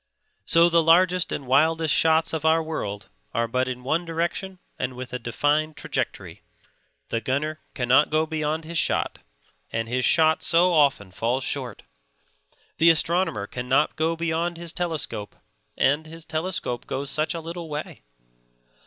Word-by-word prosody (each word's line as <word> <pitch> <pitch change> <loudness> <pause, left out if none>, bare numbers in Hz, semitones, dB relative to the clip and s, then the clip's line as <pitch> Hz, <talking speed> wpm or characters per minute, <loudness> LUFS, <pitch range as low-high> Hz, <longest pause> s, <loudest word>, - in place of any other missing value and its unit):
So 170 +1 +5
the 170 -1 +4
largest 180 +2 +3
and 140 - -4
wildest 160 +4 +3
shots 160 0 +3
of 160 -1 -2
our 160 +1 +3
world 105 -11 -5 0.3
are 115 0 +1
but 130 +3 0
in 125 0 -6
one 155 +6 0
direction 170 +3 -3 0.2
and 130 -1 -3
with 125 0 -8
a 125 - -2
defined 145 +6 0
trajectory: - - -4 0.7
the 115 - -1
gunner 145 +6 -2 0.2
cannot 125 +3 +3
go 155 +1 +2
beyond 155 0 -2
his 165 0 -2
shot, - - 0 0.5
and 115 0 -2
his 125 +2 -1
shot 160 +2 +4
so 175 +2 +3
often 140 - +2
falls 120 +7 -1
short; 125 -7 -3 1.0
the 165 +1 +7
astronomer 165 - +1
cannot 125 +6 0
go 160 +1 0
beyond 170 +1 -2
his 170 -1 -5
telescope 160 -12 -4 0.4
and 150 +3 +2
his 165 0 -10
telescope 160 -7 -3
goes 140 +1 -3
such 155 +2 0
a - - -3
little 165 0 -7
way. 150 0 -6
155 Hz, 155 wpm, -24 LUFS, 130-165 Hz, 1.0 s, the